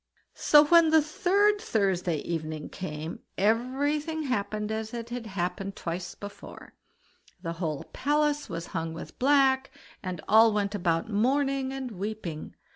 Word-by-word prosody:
So 295 Hz, 0 st, +6 dB
when 335 Hz, +1 st, +6 dB
the 320 Hz, 0 st, +6 dB
third 400 Hz, +6 st, +2 dB
Thursday 190 Hz, -, 0 dB
evening 155 Hz, -2 st, -4 dB
came, 160 Hz, -3 st, -6 dB, 0.2 s
everything 285 Hz, -, 0 dB
happened 210 Hz, -4 st, -2 dB
as 220 Hz, +1 st, -4 dB
it 235 Hz, 0 st, -6 dB
had 240 Hz, -2 st, -5 dB
happened 190 Hz, 0 st, -3 dB
twice 175 Hz, +1 st, -5 dB
before; 205 Hz, 0 st, -10 dB, 0.7 s
the 165 Hz, -1 st, -3 dB
whole 155 Hz, -4 st, -2 dB
palace 295 Hz, +1 st, +1 dB
was 165 Hz, 0 st, -4 dB
hung 165 Hz, 0 st, -3 dB
with 165 Hz, -, -9 dB
black, 270 Hz, 0 st, +4 dB, 0.3 s
and 185 Hz, -3 st, -4 dB
all 220 Hz, +1 st, +6 dB
went 205 Hz, -1 st, 0 dB
about 175 Hz, 0 st, 0 dB
mourning 270 Hz, +4 st, +1 dB
and 265 Hz, -2 st, -5 dB
weeping. 195 Hz, -5 st, -5 dB
220 Hz, 135 wpm, -28 LUFS, 180-280 Hz, 0.7 s, So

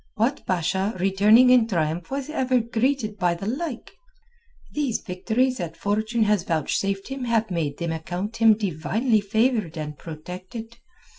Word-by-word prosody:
What 240 Hz, +6 st, 0 dB
Basha 190 Hz, +4 st, 0 dB
returning 210 Hz, +7 st, +5 dB
in 245 Hz, -3 st, +5 dB
triumph 165 Hz, -3 st, -1 dB
was 275 Hz, 0 st, -3 dB
ever 260 Hz, -5 st, +1 dB
greeted 230 Hz, -2 st, -1 dB
by 175 Hz, -2 st, +2 dB
the 175 Hz, -, -7 dB
like? 255 Hz, +3 st, -4 dB, 0.8 s
These 285 Hz, -6 st, -1 dB
victories 230 Hz, +7 st, 0 dB
that 165 Hz, -4 st, -5 dB
fortune 215 Hz, +3 st, 0 dB
has 210 Hz, -3 st, +2 dB
vouchsafed 195 Hz, -, -1 dB
him 270 Hz, -1 st, -4 dB
have 225 Hz, -3 st, +1 dB
made 155 Hz, -5 st, -2 dB
them 170 Hz, -1 st, -2 dB
account 180 Hz, +7 st, -4 dB
him 225 Hz, -2 st, +6 dB
divinely 215 Hz, -, 0 dB
favoured 215 Hz, -4 st, 0 dB
and 150 Hz, -1 st, -5 dB
protected. 185 Hz, -, -8 dB
210 Hz, 145 wpm, -24 LUFS, 180-235 Hz, 0.8 s, him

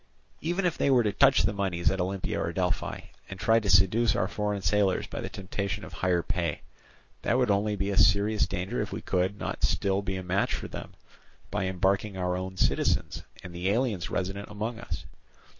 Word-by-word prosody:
"Even 175 Hz, +4 st, -1 dB
if 175 Hz, -, 0 dB
they -, -, +3 dB
were 125 Hz, -3 st, +5 dB
to 105 Hz, -, +1 dB
touch 135 Hz, +5 st, +5 dB
the -, -, +1 dB
moneys 95 Hz, -4 st, 0 dB
at 95 Hz, -, -1 dB
Olympia 95 Hz, +1 st, -2 dB
or 85 Hz, -, -1 dB
Delphi, 90 Hz, 0 st, -1 dB, 0.3 s
and 95 Hz, 0 st, -7 dB
try 115 Hz, +3 st, +4 dB
to 105 Hz, -3 st, -3 dB
seduce 95 Hz, +5 st, +4 dB
our 95 Hz, -, +1 dB
foreign 105 Hz, -1 st, -2 dB
sailors 100 Hz, -2 st, +2 dB
by -, -, -6 dB
the -, -, -4 dB
temptation 100 Hz, +1 st, -4 dB
of -, -, -11 dB
higher 90 Hz, -2 st, +1 dB
pay, 90 Hz, -2 st, -2 dB, 0.6 s
that -, -, +1 dB
would 125 Hz, -4 st, +3 dB
only 105 Hz, +1 st, +1 dB
be 100 Hz, 0 st, -1 dB
a 100 Hz, -, -2 dB
serious 105 Hz, +1 st, +4 dB
danger 90 Hz, 0 st, -2 dB
if -, -, -4 dB
we -, -, -5 dB
could 95 Hz, +3 st, 0 dB
not -, -, -4 dB
still 100 Hz, 0 st, +2 dB
be 95 Hz, -1 st, -3 dB
a 95 Hz, -, -4 dB
match 90 Hz, +2 st, 0 dB
for -, -, -5 dB
them -, -, -8 dB, 0.6 s
by 100 Hz, -2 st, -1 dB
embarking 95 Hz, +2 st, 0 dB
our 90 Hz, -1 st, 0 dB
own 95 Hz, +1 st, -5 dB
citizens -, -, +1 dB, 0.2 s
and 90 Hz, -, -9 dB
the 90 Hz, +2 st, -1 dB
aliens 110 Hz, -5 st, 0 dB
resident 95 Hz, +2 st, -3 dB
among 110 Hz, +3 st, -4 dB
us. 120 Hz, -, -6 dB
100 Hz, 205 wpm, -28 LUFS, 95-105 Hz, 0.6 s, were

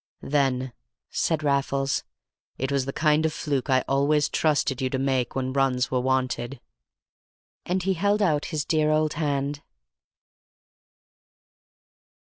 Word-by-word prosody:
"Then," 130 Hz, -3 st, 0 dB, 0.4 s
said 160 Hz, -2 st, 0 dB
Raffles, 140 Hz, -1 st, 0 dB, 0.5 s
"it 135 Hz, +1 st, -2 dB
was 140 Hz, -2 st, +1 dB
the 135 Hz, -, -3 dB
kind 150 Hz, +1 st, +2 dB
of 160 Hz, -, +1 dB
fluke 145 Hz, -2 st, -2 dB
I 130 Hz, -1 st, +3 dB
always 145 Hz, +2 st, +2 dB
trusted 145 Hz, -4 st, +1 dB
you 130 Hz, -, 0 dB
to 130 Hz, -, -1 dB
make 130 Hz, -2 st, 0 dB
when 130 Hz, -1 st, -2 dB
runs 130 Hz, -2 st, +1 dB
were 130 Hz, -, +2 dB
wanted." 130 Hz, 0 st, -1 dB, 1.1 s
And 180 Hz, +1 st, 0 dB
he 190 Hz, +1 st, +1 dB
held 200 Hz, +4 st, +1 dB
out 155 Hz, -6 st, +1 dB
his 155 Hz, -3 st, -3 dB
dear 155 Hz, -1 st, +2 dB
old 155 Hz, 0 st, +2 dB
hand. 145 Hz, -1 st, -1 dB
140 Hz, 130 wpm, -25 LUFS, 130-155 Hz, 1.1 s, I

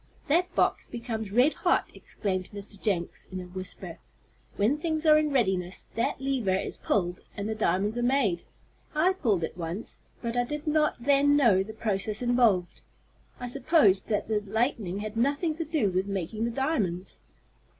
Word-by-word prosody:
"That 340 Hz, +4 st, +1 dB
box -, -, +1 dB
becomes 225 Hz, -3 st, -5 dB
red 250 Hz, +8 st, +4 dB
hot," -, -, +1 dB
exclaimed 185 Hz, -3 st, -4 dB
Mr. 205 Hz, -1 st, -9 dB
Jenks, 180 Hz, -5 st, -2 dB
in 185 Hz, -, -4 dB
a -, -, -5 dB
whisper. 185 Hz, +1 st, -8 dB, 0.6 s
"When 240 Hz, +9 st, +2 dB
things 315 Hz, 0 st, -2 dB
are 305 Hz, -1 st, +7 dB
in 305 Hz, 0 st, +3 dB
readiness, 190 Hz, -9 st, 0 dB
that 230 Hz, -, -1 dB
lever 260 Hz, -8 st, 0 dB
is 190 Hz, -, -3 dB
pulled 180 Hz, -3 st, -1 dB, 0.2 s
and 200 Hz, 0 st, -3 dB
the 220 Hz, -, -1 dB
diamonds 210 Hz, +2 st, 0 dB
are -, -, 0 dB
made. 240 Hz, -9 st, +1 dB, 0.5 s
I 345 Hz, +5 st, +4 dB
pulled 220 Hz, -, 0 dB
it 160 Hz, -, -3 dB
once, 175 Hz, +5 st, -5 dB, 0.2 s
but 235 Hz, -1 st, -4 dB
I 245 Hz, -, +3 dB
did 295 Hz, +5 st, -5 dB
not 305 Hz, 0 st, +2 dB
then 285 Hz, +1 st, +4 dB
know 225 Hz, -9 st, +5 dB
the 215 Hz, +3 st, -5 dB
process 215 Hz, +1 st, -1 dB
involved. 235 Hz, -8 st, +2 dB, 0.6 s
I 245 Hz, -, -4 dB
supposed 245 Hz, -, +3 dB
that 210 Hz, -2 st, -1 dB
the 215 Hz, -1 st, +1 dB
lightning 210 Hz, -2 st, -1 dB
had 215 Hz, 0 st, -5 dB
nothing 285 Hz, +7 st, +1 dB
to 330 Hz, -, -2 dB
do 300 Hz, -, +1 dB
with 185 Hz, +2 st, 0 dB
making 200 Hz, +3 st, -2 dB
the -, -, 0 dB
diamonds." 225 Hz, -, -1 dB
220 Hz, 170 wpm, -28 LUFS, 190-275 Hz, 0.6 s, are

